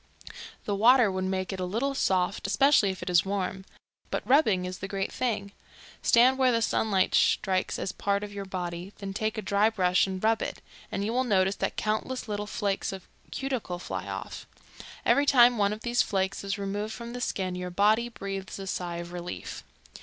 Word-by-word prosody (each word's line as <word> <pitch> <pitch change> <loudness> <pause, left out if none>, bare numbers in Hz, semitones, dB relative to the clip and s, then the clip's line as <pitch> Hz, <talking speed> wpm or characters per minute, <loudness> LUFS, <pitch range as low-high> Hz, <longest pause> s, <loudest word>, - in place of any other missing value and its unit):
The 205 - -1
water 230 +1 +5
would 185 0 -2
make 190 0 -2
it 190 - -5
a - - -1
little 235 +10 -1
soft, 185 -8 0
especially 245 +1 +4
if 190 -1 -5
it 180 - -4
was 175 -2 +4
warm. 190 -1 -3 0.4
But - - -3
rubbing 220 -10 +4
is 180 0 -6
the 195 - -5
great 195 0 -3
thing. 210 -5 -2 0.5
Stand 255 +3 +5
where 260 -1 +4
the 230 - +2
sunlight 195 -4 +1
strikes 185 -1 +2
a - - -3
part 200 0 -1
of 205 -1 -7
your 200 -1 -5
body, 180 0 -5
then 195 -1 -6
take 215 +2 -2
a 215 - -3
dry 200 +3 +3
brush 185 -4 +2
and 190 0 -5
rub 225 0 +3
it, - - -4 0.3
and 200 - -2
you 225 - -1
will 255 +1 +2
notice 195 -4 +2
that - - -2
countless 220 +4 -2
little 210 -1 -3
flakes 200 -2 -1
of 190 -2 -9 0.2
cuticle 255 -10 -3
fly 175 - -5
off. - - -6 0.6
Every 285 0 +4
time 245 -3 +6
one 200 0 +3
of 215 +1 -5
these 240 0 +2
flakes 190 0 -1
is 200 +1 -2
removed 205 +2 -3
from 235 0 -7
the 245 - -5
skin 185 -5 -2
your 180 0 -4
body 215 +6 +2
breathes 195 -4 -6
a 195 - -6
sigh 180 -2 -3
of 170 0 -7
relief. 175 0 -6
200 Hz, 200 wpm, -28 LUFS, 190-225 Hz, 0.6 s, time